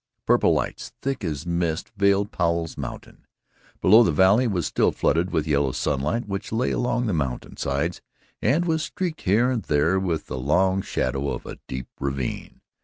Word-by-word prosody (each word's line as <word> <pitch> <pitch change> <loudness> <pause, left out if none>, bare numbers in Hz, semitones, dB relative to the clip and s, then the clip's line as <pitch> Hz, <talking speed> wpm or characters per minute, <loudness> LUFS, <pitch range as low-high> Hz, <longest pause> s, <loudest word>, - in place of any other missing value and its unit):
Purple - - +4
lights - - -2
thick 135 -4 -2
as 75 -4 -3
mist 85 -2 -1
veiled 100 0 +2
Powell's 85 -1 -1
Mountain. - - -8 0.6
Below, 110 +5 +7
the 95 - +3
valley 95 - +4
was 90 -7 -1
still - - +2
flooded 85 +3 +1
with 80 -4 0
yellow 70 -4 +1
sunlight 75 - -1
which 100 0 -4
lay 115 +3 0
along 125 0 0
the 105 - 0
mountain 70 -6 -3
sides 70 +5 -2 0.4
and 165 +6 +2
was 160 -2 +1
streaked 170 0 -3
here 110 +6 +3
and 120 -3 -1
there 80 +3 +2
with 90 -4 -2
the 65 - -5
long 95 +8 +2
shadow 70 -6 -2
of - - -5
a - - -8
deep 65 -1 -5
ravine. 70 -2 -4
90 Hz, 175 wpm, -24 LUFS, 75-110 Hz, 0.6 s, Below